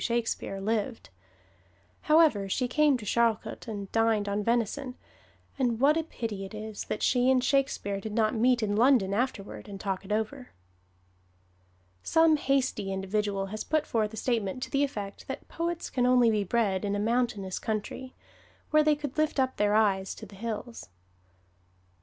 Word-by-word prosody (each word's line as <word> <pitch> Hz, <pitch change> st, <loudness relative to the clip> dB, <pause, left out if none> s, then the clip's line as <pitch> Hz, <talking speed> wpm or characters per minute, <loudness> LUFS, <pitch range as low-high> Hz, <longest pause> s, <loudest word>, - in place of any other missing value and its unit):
Shakespeare 230 Hz, -4 st, -2 dB
lived. 220 Hz, -, -2 dB, 1.0 s
However, 305 Hz, -12 st, +4 dB
she 250 Hz, +6 st, 0 dB
came 295 Hz, +1 st, +3 dB
to 220 Hz, -, -9 dB
Charlcote 230 Hz, +2 st, 0 dB
and 200 Hz, -3 st, -6 dB
dined 225 Hz, -2 st, +2 dB
on 200 Hz, +1 st, -1 dB
venison, 240 Hz, +3 st, -1 dB, 0.6 s
and 240 Hz, -4 st, +1 dB
what 285 Hz, +4 st, +5 dB
a 325 Hz, -, +2 dB
pity 225 Hz, -10 st, -5 dB
it 195 Hz, +2 st, -8 dB
is 215 Hz, 0 st, -6 dB
that -, -, -4 dB
she 250 Hz, 0 st, +3 dB
and 255 Hz, -1 st, +3 dB
Shakespeare 255 Hz, -7 st, 0 dB
did 220 Hz, -, -5 dB
not 215 Hz, -1 st, +2 dB
meet 240 Hz, 0 st, +2 dB
in 205 Hz, -1 st, 0 dB
London 230 Hz, -4 st, +4 dB
afterward 210 Hz, -3 st, -3 dB
and 195 Hz, -1 st, -7 dB
talk 195 Hz, -1 st, -3 dB
it 195 Hz, -, -9 dB
over! 220 Hz, +5 st, -3 dB, 1.5 s
Some 325 Hz, -, +4 dB
hasty 260 Hz, -8 st, 0 dB
individual 195 Hz, +1 st, -1 dB
has 215 Hz, -, -3 dB
put 310 Hz, -1 st, 0 dB
forth 215 Hz, -2 st, 0 dB
a 220 Hz, -, -9 dB
statement 230 Hz, -1 st, -1 dB
to -, -, -6 dB
the 280 Hz, 0 st, +2 dB
effect 205 Hz, -8 st, -5 dB
that 265 Hz, -, -6 dB
poets 340 Hz, 0 st, -3 dB
can 250 Hz, -1 st, +1 dB
only 245 Hz, -2 st, +5 dB
be 210 Hz, -2 st, +1 dB
bred 200 Hz, -2 st, 0 dB
in 205 Hz, 0 st, -1 dB
a -, -, -1 dB
mountainous 215 Hz, -4 st, -1 dB
country, 220 Hz, +4 st, -4 dB, 0.6 s
where 305 Hz, 0 st, +5 dB
they 300 Hz, 0 st, +4 dB
could 290 Hz, 0 st, -5 dB
lift 310 Hz, -2 st, +1 dB
up 260 Hz, 0 st, +1 dB
their 205 Hz, 0 st, +2 dB
eyes 195 Hz, -3 st, +2 dB
to -, -, -9 dB
the 200 Hz, -, -15 dB
hills. 230 Hz, +2 st, -6 dB
225 Hz, 170 wpm, -28 LUFS, 205-260 Hz, 1.5 s, what